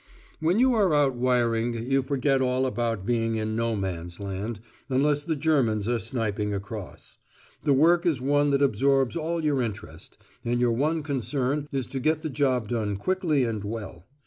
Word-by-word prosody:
When 165 +5 +2
you 255 +2 +4
are 195 -8 +3
out 145 -2 +3
wiring 120 -2 +1 0.2
you 135 0 +4
forget 135 0 +1
all 130 0 +1
about 115 -6 -2
being 115 -1 0
in 110 0 -2
No 115 0 0
Man's 90 -3 -4
Land, 100 +3 -4 0.3
unless 145 +2 +2
the 160 0 -1
Germans 135 -9 +1
are 120 -1 +1
sniping 105 -3 -2
across. 100 -1 -8 0.5
The 145 - +4
work 170 +5 +4
is 155 -6 +1
one 145 +2 +2
that 140 0 +2
absorbs 135 +1 +2
all 165 0 -2
your 145 -3 +2
interest, 105 -8 -7 0.3
and 120 0 0
your 120 -1 +3
one 155 +6 0
concern 140 +1 -2
is 135 -2 -2
to 135 - -5
get 155 +4 0
the 155 - -3
job 130 -5 0
done 105 -4 -1
quickly 165 - +1
and 110 -4 -2
well. 100 -5 -6
125 Hz, 175 wpm, -26 LUFS, 110-145 Hz, 0.5 s, you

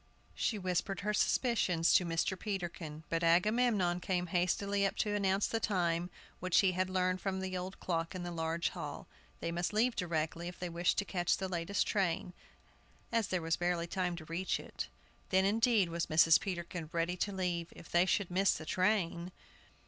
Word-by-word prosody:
She 220 - -1
whispered 185 0 -1
her 210 +2 0
suspicions 205 -8 +2
to 180 - +5
Mr. 165 +3 0
Peterkin; 175 -6 -5
but 165 0 0
Agamemnon 185 +1 +3
came 180 0 -1
hastily 200 +3 +1
up 195 - +1
to 210 - 0
announce 195 -1 +2
the 225 - -1
time, 175 -5 0 0.3
which 185 -1 +3
he 190 -2 +3
had 185 +1 -1
learned 185 0 0
from 190 -1 -2
the 190 0 -3 0.3
clock 165 0 -2
in 180 - -4
the 175 - -4
large 165 0 -1
hall. - - -7 0.3
They 170 - -2
must 175 +3 -2
leave 230 +3 +2
directly 170 -1 -2
if 175 - -7
they 180 - -4
wished 170 +1 +1
to 200 - +1
catch 175 -3 +1
the 190 - -3
latest 180 +2 -1
train, 180 -2 0 0.8
as 230 -3 +1
there 180 -3 -1
was 165 0 0
barely 175 -1 0
time 180 0 -1
to 165 -2 -9
reach 170 +4 -1
it. - - -6 0.4
Then, 190 0 +3
indeed, 220 -2 +3
was 170 0 -2
Mrs. 160 +1 +6
Peterkin 175 -3 -4
ready 170 +1 0
to 200 - -1
leave. 180 -3 -2
If - - -13
they 175 +2 +4
should 190 -2 +1
miss 190 +2 +3
the 160 - -7
train! 180 -1 0
180 Hz, 185 wpm, -33 LUFS, 170-195 Hz, 0.8 s, Mrs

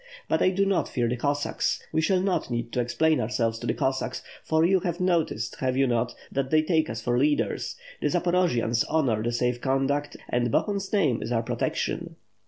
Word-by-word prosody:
But - - +1
I - - +5
do 195 +1 +1
not 195 -1 +1
fear 120 -1 0
the 120 - 0
Cossacks. 145 +3 -1
We 160 - +1
shall 180 +3 +2
not 190 -7 0
need 120 -1 -3
to - - -1
explain 155 +6 +2
ourselves 115 0 -1
to - - -5
the - - 0
Cossacks; 130 0 -1 0.2
for 160 +1 +2
you 190 +2 +4
have 175 -2 -3
noticed 165 - 0
have 130 -1 -1
you 135 - +4
not, 120 -1 0 0.2
that 135 -1 -1
they 155 +1 +4
take 160 -1 +1
us 110 0 -4
for 120 +1 +1
leaders. 145 +2 0 0.3
The - - +2
Zaporojians 170 -11 +1
honor 135 -9 +1
the 120 +2 -1
safe 120 0 0
conduct, 135 +2 0
and 120 0 0
Bohun's 200 - 0
name 155 - +2
is - - -4
our 115 -1 +1
protection." - - -2
135 Hz, 200 wpm, -26 LUFS, 120-170 Hz, 0.3 s, I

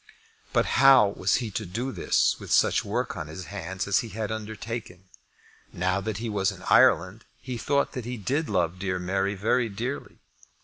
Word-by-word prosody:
But - - +2 0.2
how 135 -7 +7
was 100 -1 0
he 120 -4 -2
to 110 - -3
do 115 +8 -4
this - - +1
with - - -10
such - - +3
work - - -2
on 75 - -5
his 80 +4 -8
hands 95 +2 -5
as 100 - +3
he 115 - -5
had 110 0 -4
undertaken? 110 -3 -6 0.6
Now 95 +2 0
that 105 0 -3
he 115 +2 -4
was 100 -3 0
in - - -12
Ireland, 95 +6 +4 0.2
he 125 - -6
thought 140 +4 0
that 125 -5 -6
he 125 +1 -4
did 140 - -1
love 90 -2 0
dear 95 -1 -1
Mary 95 +3 -1
very 115 +4 +1
dearly. 120 +7 -5
105 Hz, 185 wpm, -26 LUFS, 95-115 Hz, 0.6 s, how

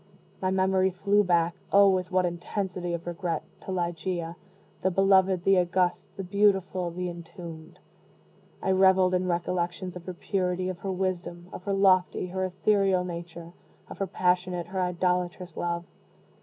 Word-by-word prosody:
My 185 - +1
memory 190 0 +2
flew 200 +3 +2
back 170 -2 +2 0.2
(oh, 200 0 +7
with 185 -2 +1
what 185 -1 +3
intensity 175 0 -3
of 170 - -8
regret!) 175 0 -3 0.2
to - - -4
Ligeia, 175 -1 -2 0.5
the 190 - +2
beloved, 190 -1 +3
the 195 -1 +5
august, 180 0 +1
the 195 - -4
beautiful, 190 -2 +1
the 180 +1 -4
entombed. 170 -1 -9 0.9
I 190 - +2
reveled 190 -1 +5
in 185 0 +1
recollections 175 +1 -2
of 180 0 -10
her 185 - -5
purity, 185 0 -1
of 180 -1 -5
her 195 - -3
wisdom, 180 -2 -3
of 180 - -8
her 200 - 0
lofty 185 -2 +3
her 190 +1 -2
ethereal 190 0 +2
nature, 170 -1 -7 0.4
of - - -10
her 195 - -1
passionate, 180 -1 0
her 190 +2 -3
idolatrous 180 0 -1
love. 170 0 -2
180 Hz, 155 wpm, -27 LUFS, 175-190 Hz, 0.9 s, oh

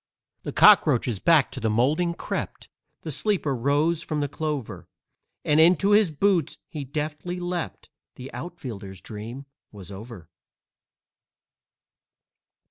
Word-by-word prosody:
The - - -5
cockroaches 135 - +5
back 160 - +4
to - - -6
the 110 - 0
moulding 150 +10 +1
crept, - - -5 0.3
The 160 - -5
sleeper 165 -4 0
rose 145 +6 +1
from 155 -1 -3
the 145 - 0
clover; 150 -3 -4 0.6
And 150 +1 +3
into 180 +5 +5
his 205 -3 +5
boots 170 0 +1
he 150 -4 -6
deftly 150 +5 -4
leapt 175 -1 -5 0.2
The 130 +1 -10
outfielder's 110 - -7
dream 115 +8 -8 0.3
was 100 -3 -11
over. 100 -3 -10
150 Hz, 120 wpm, -25 LUFS, 120-170 Hz, 0.6 s, cockroaches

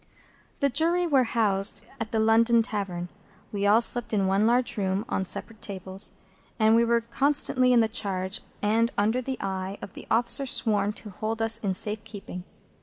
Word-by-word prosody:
The 280 - +3
Jury 335 +6 +2
were 275 -6 +3
housed 205 -3 0
at 225 -1 -5
the 225 - -1
London 225 +1 +4
Tavern. 190 -6 -4 0.4
We 205 -1 -1
all 215 +3 +5
slept 240 -1 0
in 200 -2 +1
one 195 +3 +2
large 245 +1 +1
room 195 0 -1
on 190 - -2
separate 220 +4 -5
tables, 190 -1 -1 0.4
and 220 0 +4
we 230 - +4
were 235 0 +2
constantly 255 +1 +2
in 240 -2 +5
the 225 - +2
charge 190 -3 -2 0.2
and 225 +3 +2
under 220 +5 +1
the 260 +1 -4
eye 190 0 -4
of 200 - -9
the - - -11
officer 240 +4 +2
sworn 210 -4 +1
to 210 0 -9
hold 220 +4 -4
us 225 0 +3
in 195 -4 -2
safe 210 +3 -1
keeping. 185 -3 -9
220 Hz, 185 wpm, -26 LUFS, 200-235 Hz, 0.4 s, all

